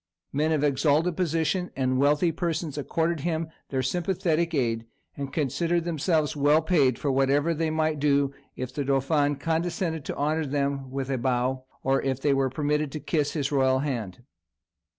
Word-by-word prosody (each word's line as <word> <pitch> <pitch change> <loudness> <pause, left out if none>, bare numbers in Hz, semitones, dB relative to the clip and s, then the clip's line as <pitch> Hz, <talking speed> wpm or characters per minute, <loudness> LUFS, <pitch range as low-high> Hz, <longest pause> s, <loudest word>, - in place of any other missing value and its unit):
Men 155 +3 +1
of 150 -2 +1
exalted 150 +4 +2
position 175 +1 0
and 130 -1 +1
wealthy 145 +4 +3
persons 165 -2 -2
accorded 165 +3 -1
him 160 +1 -2 0.2
their 130 -1 -1
sympathetic 170 +2 0
aid, 115 -4 0 0.3
and 140 -1 -5
considered 165 +4 0
themselves 160 -2 0
well 150 +2 +4
paid 145 -8 +3
for 140 - -1
whatever 140 +4 +2
they 165 0 -1
might 155 -1 0
do 140 -1 +2 0.2
if 130 0 -5
"the 145 - -2
dauphin" 145 +2 +1
condescended 165 +1 -1
to - - -4
honour 155 +2 0
them 140 -1 -1
with 135 0 -3
a 130 - 0
bow, 130 +1 0 0.2
or 135 0 +2
if 135 -1 -1
they 140 0 +2
were 135 -1 +2
permitted 150 0 -1
to 155 - -3
kiss 150 0 -1
his 145 -3 -1
royal 130 -2 +3
hand. 120 -8 -4
145 Hz, 170 wpm, -26 LUFS, 135-160 Hz, 0.3 s, well